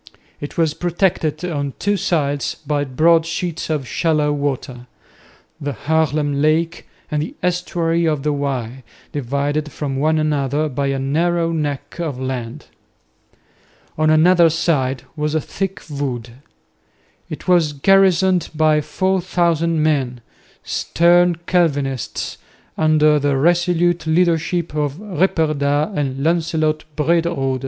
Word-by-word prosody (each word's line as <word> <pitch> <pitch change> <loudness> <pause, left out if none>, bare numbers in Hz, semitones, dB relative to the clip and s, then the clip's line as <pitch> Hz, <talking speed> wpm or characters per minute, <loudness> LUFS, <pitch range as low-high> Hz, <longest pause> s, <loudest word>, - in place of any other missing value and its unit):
It 145 - -8
was 160 -3 +2
protected 175 -3 -1
on 145 -5 -3
two 205 0 0
sides 145 -6 -1
by 145 0 0
broad 160 +5 +3
sheets 170 0 -4
of 150 -5 -2
shallow 150 +3 +1
water, 135 -3 -3 0.7
the 145 -2 -3
Haarlem 150 0 0
lake 160 +3 0 0.2
and 150 -1 0
the 155 - -5
estuary 170 -2 0
of 150 -3 -1
the 150 -1 +1
Y, 135 -3 -3 0.3
divided 145 +3 -2
from 140 -3 -4
one 155 +3 +2
another 150 0 0
by 140 +1 -2
a 135 0 -1
narrow 165 +5 0
neck 145 -1 -4
of 150 -7 -3
land. 130 -3 -5 1.3
On 155 0 +2
another 170 +2 +5
side 140 -6 0
was 150 0 -2
a - - +3
thick 195 +5 -4
wood. 130 -6 -4 1.0
It - - -8
was 175 -4 +3
garrisoned 185 +3 +3
by 155 0 +3
4000 170 -1 0
men, 135 -6 0 0.4
stern 175 +1 +3
Calvinists, 145 -9 -1 0.4
under 155 -1 +3
the 140 -1 +1
resolute 175 +1 +2
leadership 170 0 +1
of 145 -2 -1
Ripperda 155 -6 0
and 135 -2 -2
Lancelot 160 -2 0
Brederode. 155 -4 0
155 Hz, 120 wpm, -19 LUFS, 140-170 Hz, 1.3 s, another